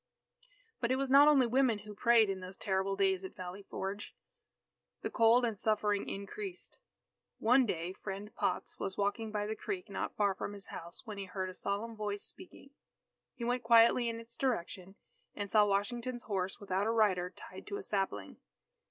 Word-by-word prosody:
But 235 - 0
it - - +4
was 270 0 -1
not 280 +2 +8
only 280 -4 +6
women 245 -1 +3
who 210 - -8
prayed 230 +1 +5
in 195 -1 -2
those 185 +1 -9
terrible 190 0 0
days 195 -1 +2
at 190 - -8
Valley 185 +2 -7
Forge. 195 +1 -5 0.9
The - - -2
cold 235 +1 +5
and 225 -2 -1
suffering 210 -2 +1
increased. 360 - -7 0.6
One 250 +3 +4
day 175 -1 -2
Friend 200 +2 -7
Potts - - -2
was 190 - -4
walking 205 +2 -1
by 210 -1 -1
the 215 +1 -3
creek 370 - -5
not - - -3
far 205 -2 +2
from 205 - -5
his 200 -1 -5
house, 170 +7 -7
when 210 -3 -6
he 195 - -4
heard 185 0 -4
a - - -12
solemn 205 +5 -3
voice 205 -1 -3
speaking. 350 -6 -9 0.6
He 235 - -6
went 245 +1 0
quietly 235 +1 +5
in 230 0 -4
its 230 0 -9
direction, 190 -6 -2 0.4
and 205 -2 -4
saw 210 -1 +6
Washington's 240 +5 -1
horse 190 -3 -2
without 195 0 -1
a - - +2
rider 195 -6 +2
tied 185 - -11
to 405 - -3
a 410 - -7
sapling. 195 - -2
210 Hz, 185 wpm, -33 LUFS, 195-235 Hz, 0.9 s, not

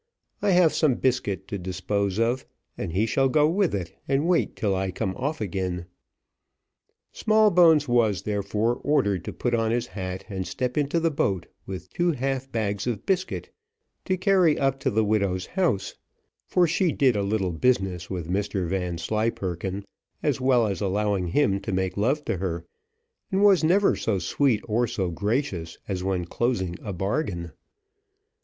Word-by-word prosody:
I 205 - +2
have 180 -4 +5
some 150 -6 +3
biscuit 105 -8 -1
to 100 - -3
dispose 95 +2 -2
of, 120 +3 +1 0.3
and - - -4
he 100 +6 +1
shall 135 +4 +2
go 150 +2 +4
with 180 - +1
it 90 -4 -4
and 140 +4 +1
wait 180 -2 +1
till 100 -3 0
I 95 0 -1
come 95 +1 -3
off 145 +5 -2
again. 95 -4 -3 1.3
Smallbones 180 -9 +4
was, 110 -6 +2
therefore, 105 +3 0
ordered 100 - +1
to - - -4
put 120 - -2
on 115 -1 +2
his 120 +1 0
hat 95 -5 -6
and 95 -4 -4
step 125 +7 -2
into 150 +3 +1
the 165 0 +1
boat 95 - 0 0.2
with 95 -1 -7
two 175 -1 +1
half 135 0 -2
bags 105 -2 -2
of 115 -5 -3
biscuit 190 -1 -1 0.5
to 185 - 0
carry 185 -4 +3
up 135 0 +1
to 135 - 0
the 110 -2 +1
widow's 100 -3 0
house, 125 - 0 0.5
for 180 - +3
she 175 +1 +1
did 130 -4 +3
a 100 - +1
little 100 -2 0
business 95 -4 0
with 90 -4 -4
Mr 95 0 -1
Vanslyperken, 95 +1 -2 0.4
as - - 0
well 130 -3 +4
as 100 -1 -2
allowing 100 -1 0
him 100 - +2
to 100 +2 -5
make 95 -1 -1
love 135 +9 0
to 115 - -1
her; 85 -2 -3 0.7
and 195 +1 +2
was 195 -5 +6
never 190 +5 +4
so 110 -3 -1
sweet 110 - +1
or 120 +2 +1
so 95 -5 -2
gracious, 100 - -2
as 95 -2 -3
when 95 -2 -1
closing 95 -3 -1
a 105 - -5
bargain. 95 - -2
110 Hz, 165 wpm, -25 LUFS, 95-135 Hz, 1.3 s, was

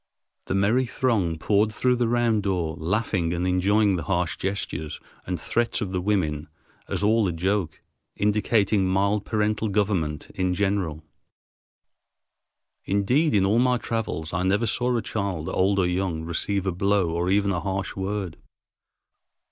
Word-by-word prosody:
The - - -2
merry 110 +7 +2
throng 105 -11 0
poured 105 +6 +2
through 125 +3 +1
the 120 -1 +1
round 115 -2 +2
door, 90 -5 -1
laughing 90 -1 0
and 85 +1 -1
enjoying 95 +2 +2
the 85 - -4
harsh 90 -2 0
gestures 95 -5 -4 0.3
and 90 -1 -2
threats 120 0 0
of 100 -4 -3
the 90 -1 -1
women 80 -7 0 0.4
as - - -2
all 110 0 +3
a - - 0
joke, 90 +1 -1 0.3
indicating 105 -1 +2
mild 100 +2 +1
parental 105 0 0
government 95 -7 -1
in 90 -1 0
general. 95 -6 -1 1.8
Indeed, 120 +10 +2
in 95 -2 +4
all 105 +4 +3
my 125 0 +3
travels 110 -9 -3
I 85 - 0
never 100 +5 +2
saw 125 +2 0
a 115 - -2
child, 100 -7 -3
old 95 +2 +1
or 95 - +3
young, 90 -2 -1
receive 95 +4 -1
a 95 - +1
blow 95 -1 +1
or 85 +2 -1
even 100 +1 +2
a 90 - 0
harsh 95 +2 -3
word. 95 -3 -3
100 Hz, 155 wpm, -25 LUFS, 90-105 Hz, 1.8 s, in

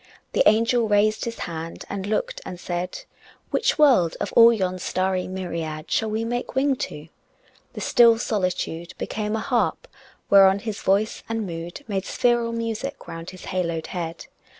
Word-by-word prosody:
The - - +2
angel 230 +1 +2
raised 210 +1 +2
his 230 -1 -4
hand 165 0 -6
and 200 -1 -4
looked - - -2
and 180 - -7
said, 175 0 -4 0.5
"Which 470 - +1
world, 250 - +4
of 205 - -3
all 230 0 +8
yon 185 -5 -1
starry 185 0 -1
myriad 165 -4 -5
Shall 220 - +1
we 220 +1 -1
make 245 +2 -3
wing 270 +1 +2
to?" 150 -8 -6 0.7
The - - -6
still 235 -1 +5
solitude 180 -6 -2
Became 210 0 -3
a - - -1
harp 245 - 0 0.4
whereon 195 -1 +7
his 210 0 -5
voice 200 +3 +1
and 225 -1 -2
mood 170 +7 -6
Made 195 -3 -2
spheral 240 -1 +1
music 230 +4 -4
round 165 +1 -7
his 185 - -11
haloed 170 -3 -1
head. 170 -2 -5
205 Hz, 160 wpm, -24 LUFS, 180-230 Hz, 0.7 s, all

